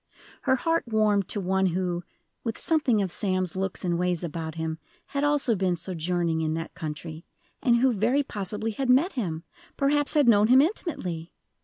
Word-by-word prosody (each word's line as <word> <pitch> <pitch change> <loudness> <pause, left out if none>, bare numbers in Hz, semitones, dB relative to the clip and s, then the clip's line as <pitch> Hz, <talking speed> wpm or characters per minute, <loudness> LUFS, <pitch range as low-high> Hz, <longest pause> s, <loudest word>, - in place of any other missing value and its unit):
Her 260 -2 +3
heart 330 +5 0
warmed 210 -4 +2
to 205 - -2
one 190 0 +1
who, 175 0 -1 0.4
with 225 -2 -3
something 265 -10 +2
of 185 - -3
Sam's 185 -3 -1
looks 190 0 -3
and 175 -1 0
ways 180 -1 0
about 160 -1 -4
him, 160 0 -3 0.3
had 280 0 -3
also 290 -5 +2
been 185 -2 +1
sojourning 170 -1 -1
in 155 0 0
that 165 0 -5
country, 155 +1 -6 0.4
and 240 -2 +4
who 250 +1 +3
very 240 +7 +2
possibly 210 -1 -3
had 255 +4 -3
met 280 +10 +4
him 165 -10 -3 0.3
perhaps 290 +2 +2
had 290 -4 +4
known 210 -2 +6
him 255 +3 +7
intimately! 190 - -1
195 Hz, 175 wpm, -26 LUFS, 175-255 Hz, 0.4 s, him